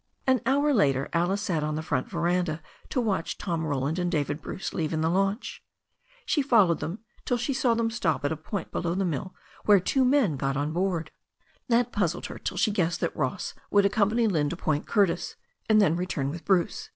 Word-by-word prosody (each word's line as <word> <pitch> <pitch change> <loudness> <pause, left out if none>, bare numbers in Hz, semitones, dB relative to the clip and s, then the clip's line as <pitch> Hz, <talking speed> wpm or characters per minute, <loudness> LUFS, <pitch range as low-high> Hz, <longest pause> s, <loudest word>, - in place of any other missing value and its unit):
An 260 -1 +3
hour 285 +2 +3
later 140 - +2
Alice 180 +4 +1
sat 165 -7 -1
on 150 0 -1
the 155 - -3
front 225 - -1
veranda 175 -3 0 0.3
to - - -1
watch 210 -8 -1
Tom 170 -4 -2
Roland 145 +3 -1
and 175 0 0
David 150 -2 -1
Bruce 190 - -5
leave 160 -3 -2
in 155 - 0
the 160 +1 +1
launch. 195 +5 -1 0.6
She 295 - +2
fol 230 -9 +4
lowed 170 - +1
them 180 +7 -5 0.2
till 245 - 0
she 245 +4 -1
saw 250 -3 +2
them 225 0 0
stop 170 -10 -1
at 145 - +1
a - - 0
point 160 +4 -5
below 170 0 -1
the 195 0 0
mill 175 +3 -3 0.3
where 205 -2 +6
two 260 +9 +1
men 250 - +3
got 135 +1 -1
aboard. 165 +2 -1 0.6
That 240 0 +2
puzzled 180 -5 -1
her - - -7
till - - -4
she 215 - +2
guessed 175 -4 0
that - - -1
Ross - - -2 0.2
would 200 -1 +4
accompany 210 +3 +2
Lynne 155 -9 +1
to 170 - -5
Point 155 -4 -1
Curtis, 195 -5 +1 0.3
and 215 -1 +6
then 185 -6 +4
return 165 -6 -2
with 170 +2 -8
Bruce. 200 - +1
180 Hz, 210 wpm, -27 LUFS, 160-215 Hz, 0.6 s, where